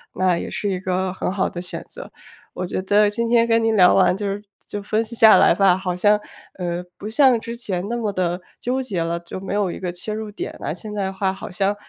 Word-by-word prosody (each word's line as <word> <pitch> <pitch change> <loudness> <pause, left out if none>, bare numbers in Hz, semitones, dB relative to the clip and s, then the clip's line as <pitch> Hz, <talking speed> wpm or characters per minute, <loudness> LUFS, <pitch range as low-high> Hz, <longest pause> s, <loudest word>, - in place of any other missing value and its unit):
那 185 -2 +2
也 - - -5
是 205 - -2
一 185 -2 -1
个 185 0 -1
很 185 - -2
好 195 0 0
的 175 - -6
选 180 - -5
择。 - - -10 0.4
我 185 - -4
觉 180 - -3
得 205 +2 +4
今 235 +2 -1
天 235 -1 +4
跟 230 0 +3
您 225 0 +2
聊 180 -3 +6
完 180 -1 +4
就 205 - -4 0.4
就 205 - -5
分 215 +2 0
析 230 +2 -9
下 220 -1 +8
来 - - +6
吧， 185 0 +4
好 185 -1 -3
像， 205 +3 +3 0.4
呃， 175 -1 -3
不 205 - -7
像 250 +1 +4
之 230 +1 -6
前 195 -5 -4
那 235 - -2
么 220 -4 -1
地 180 -1 -1 0.2
纠 255 +2 -1
结 200 -10 -2
了， 170 +1 -2
就 170 +2 -8
没 195 - -5
有 200 -3 +1
一 - - -7
个 180 -2 -3
切 180 +5 -6
入 215 0 -4
点 205 - -6
呐。 - - -3
现 210 +5 -8
在 205 - -1
的 190 - -3
话 190 0 0
好 190 - -8
像， 195 +2 0
195 Hz, 275 characters per minute, -22 LUFS, 180-220 Hz, 0.4 s, 下